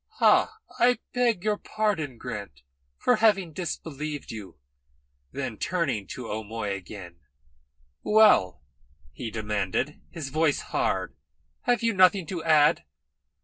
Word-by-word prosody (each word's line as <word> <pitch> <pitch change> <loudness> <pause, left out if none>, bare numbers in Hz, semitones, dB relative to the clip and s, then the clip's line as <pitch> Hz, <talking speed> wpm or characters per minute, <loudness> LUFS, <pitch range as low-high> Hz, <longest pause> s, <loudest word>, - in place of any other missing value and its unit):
"Ha! 435 0 +3 0.2
I 245 0 +5 0.2
beg 240 -7 +1
your 210 -1 +1
pardon, 195 - -2
Grant, 100 - -7 0.3
for 250 - +3
having 195 -6 +3
disbelieved 150 -3 -5
you." 100 -6 -9 0.7
Then, 130 -6 -4
turning 150 - -1
to 125 -2 -7
O'Moy 110 -1 -4
again: 90 -3 -9 0.8
"Well," 210 - +4 0.5
he 110 - -6
demanded, 105 +5 -2
his 155 -5 -6
voice 155 +1 +1
hard, - - -1 0.5
"have 245 -1 +2
you 230 0 +2
nothing 185 -1 +5
to 170 -1 -5
add?" 150 - +4
150 Hz, 115 wpm, -26 LUFS, -, 0.8 s, I